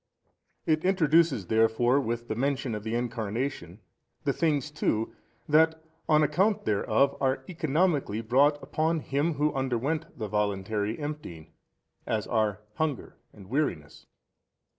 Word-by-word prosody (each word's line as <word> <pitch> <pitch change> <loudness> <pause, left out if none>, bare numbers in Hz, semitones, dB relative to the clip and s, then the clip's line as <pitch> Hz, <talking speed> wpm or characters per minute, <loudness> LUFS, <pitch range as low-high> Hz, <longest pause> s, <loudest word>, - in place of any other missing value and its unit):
A. - - +1
It 155 0 +2
introduces 165 - +3
therefore 115 +5 +3
with 120 -2 -3
the - - -2
mention 135 0 -1
of 105 -1 -4
the 110 +1 -2
Incarnation 115 - -3 0.4
the - - +1
things 150 -3 0
too 115 -6 -1 0.3
that 160 +1 +4 0.3
on 155 -1 +5
account 190 +8 +1
thereof 110 +6 +2
are 130 0 +1
economically 155 - 0
brought 140 +6 +3
upon 160 +3 0
Him 145 +4 0
Who 150 +1 +1
underwent 135 +4 -2
the 110 - -3
voluntary 105 +1 -1
emptying, 145 - -7 0.6
as 110 -2 -1
are 105 -3 0 0.2
hunger 155 -4 -2 0.2
and 100 -3 -14
weariness. 115 - -2
135 Hz, 130 wpm, -28 LUFS, 110-150 Hz, 0.6 s, on